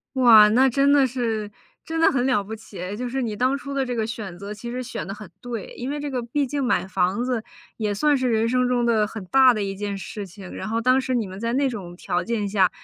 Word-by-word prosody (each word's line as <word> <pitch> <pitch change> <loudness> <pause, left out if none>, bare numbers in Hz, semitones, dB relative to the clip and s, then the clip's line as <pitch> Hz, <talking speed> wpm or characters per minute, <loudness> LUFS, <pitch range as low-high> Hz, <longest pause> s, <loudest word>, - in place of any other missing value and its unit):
哇， 225 -5 +8
那 255 +5 +5
真 275 +3 +3
的 280 -2 +5
是 225 -4 -2 0.4
真 325 - -4
的 - - +6
很 255 -2 +1
了 250 -6 +2
不 210 +3 -8
起 220 -3 -10
哎， 180 +2 -4
就 245 +4 -4
是 265 +2 -2
你 230 -4 -2
当 255 +6 +1
初 280 0 -7
的 275 -1 0
这 245 -1 -3
个 220 -2 0
选 215 -5 -6
择 200 +3 -7
其 220 +3 -8
实 250 +1 -4
选 230 -10 -6
得 195 - -4
很 210 -2 -10
对。 235 -4 -6
因 250 +2 -4
为 290 +1 -3
这 290 -1 -4
个 255 -2 -1
毕 260 +5 -1
竟 280 +2 -3
买 240 -8 +1
房 190 +4 0
子 250 -2 -1 0.4
也 210 -2 -1
算 295 +8 +2
是 255 -1 0
人 225 0 +2
生 250 0 +2
中 245 -1 +1
的 220 -3 +2
很 220 -1 -7
大 260 +4 +6
的 215 -3 -2
一 195 0 -3
件 200 0 -4
事 200 +2 -7
情， 190 0 -11
然 190 - -5
后 225 +1 -1
当 255 +2 +4
时 260 -1 -1
你 230 -3 0
们 190 +1 -9
在 230 +2 -1
那 270 +1 +2
种 190 -7 -7
条 175 0 -2
件 220 -2 -2
下， 195 -2 +3
230 Hz, 295 characters per minute, -23 LUFS, 205-255 Hz, 0.4 s, 哇